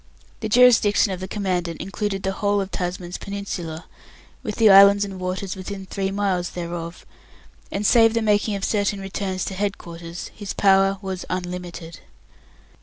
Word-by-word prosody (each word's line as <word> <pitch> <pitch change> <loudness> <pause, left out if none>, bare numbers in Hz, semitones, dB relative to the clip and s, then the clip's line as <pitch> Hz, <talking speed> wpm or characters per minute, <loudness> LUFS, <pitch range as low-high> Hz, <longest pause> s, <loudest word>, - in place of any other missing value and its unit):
The 220 - -4
jurisdiction 225 -4 +5
of 185 - -4
the 185 - -5
Commandant 180 -5 -2
included 195 0 -3
the 195 - 0
whole 205 +1 0
of 195 0 -3
Tasman's 180 0 -4
Peninsula, 185 -5 -5 0.6
with 210 - -4
the 220 -3 +6
islands 200 +1 +8
and 195 -2 -8
waters 185 +1 -3
within 195 +1 -7
three 195 +1 -2
miles 195 -3 -1
thereof; 170 0 -6 0.7
and 205 +1 -2
save 225 +1 +5
the 230 - +1
making 210 0 +2
of 195 - -5
certain 205 -1 0
returns 195 -1 -3
to - - -4
head 200 +1 -2
quarters, 170 0 -8
his 205 -2 -6
power 195 0 +4
was 190 -1 -4
unlimited. 175 -3 -5
195 Hz, 160 wpm, -23 LUFS, 180-205 Hz, 0.7 s, islands